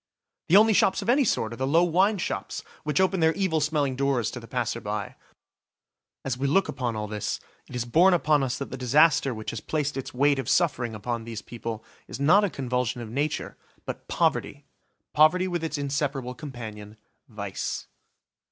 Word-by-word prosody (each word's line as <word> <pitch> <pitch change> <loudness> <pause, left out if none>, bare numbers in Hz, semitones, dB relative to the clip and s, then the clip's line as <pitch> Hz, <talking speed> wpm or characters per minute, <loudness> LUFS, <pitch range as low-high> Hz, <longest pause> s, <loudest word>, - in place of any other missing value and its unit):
The 185 - +7
only 220 +1 +6
shops 190 - +3
of - - -4
any 275 +4 +5
sort 115 - 0
are - - -8
the 130 - -1
low 165 +5 +4
wine 190 +5 +3
shops 180 - -4 0.2
which 150 +1 0
open 190 0 +2
their 160 0 +3
evil 180 -6 0
smelling 145 -3 0
doors 135 -4 0
to 125 - -6
the 115 - -12
passer 120 -2 -2
by. 105 -1 -4 1.1
As 130 -2 -2
we 140 - 0
look 195 +8 +3
upon 120 -3 -3
all 105 0 -3
this, 105 -1 -3 0.3
it - - -8
is 120 -1 -2
borne 175 +9 +5
upon 150 -3 +2
us 130 -1 -1
that 140 - -6
the 130 - -5
disaster 140 +2 +4
which 110 -2 -5
has 115 - -6
placed 150 -2 -2
its 135 - -5
weight 140 +2 +2
of 130 - -3
suffering 125 -10 +1
upon 115 +2 -3
these 110 -3 -7
people 115 -1 -6 0.2
is - - -7
not 180 +9 +5
a 205 - +2
convulsion 125 -5 -2
of 115 -2 -7
nature, 145 +4 -2 0.3
but - - -7
poverty–poverty 170 +5 0
with 175 -2 -2
its 160 -1 -2
inseparable 140 -2 -2
companion, 110 -7 -8 0.3
vice. 100 -4 -4
135 Hz, 190 wpm, -26 LUFS, 120-160 Hz, 1.1 s, The